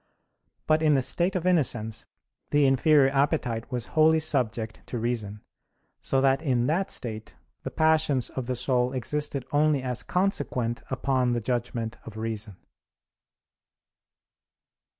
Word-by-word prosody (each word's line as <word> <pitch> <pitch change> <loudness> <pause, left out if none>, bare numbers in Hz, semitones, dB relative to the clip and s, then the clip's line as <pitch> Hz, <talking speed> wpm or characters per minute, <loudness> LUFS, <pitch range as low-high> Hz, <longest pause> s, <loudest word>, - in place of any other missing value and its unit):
But 155 0 +2
in 155 -2 +4
the 135 - +3
state 175 +8 0
of 180 -1 -2
innocence 125 -11 +1 0.4
the 145 -1 +3
inferior 135 +1 +4
appetite 135 -4 0
was 120 -2 -3
wholly 160 0 +5
subject 115 -7 -1
to 125 - -4
reason: 110 -3 -3 0.6
so 135 - 0
that 135 +1 +3
in 125 -6 +1
that 170 +8 0
state 110 -2 -5 0.3
the - - -5
passions 155 -5 +1
of 130 -3 -5
the 130 - -1
soul 125 0 +1
existed 140 +1 -2
only 145 -2 +2
as 125 -2 -2
consequent 130 - -1
upon 130 -1 0
the 120 - 0
judgment 120 -1 -3
of 110 -1 -10
reason. 110 -3 -4
130 Hz, 130 wpm, -26 LUFS, 120-150 Hz, 0.6 s, wholly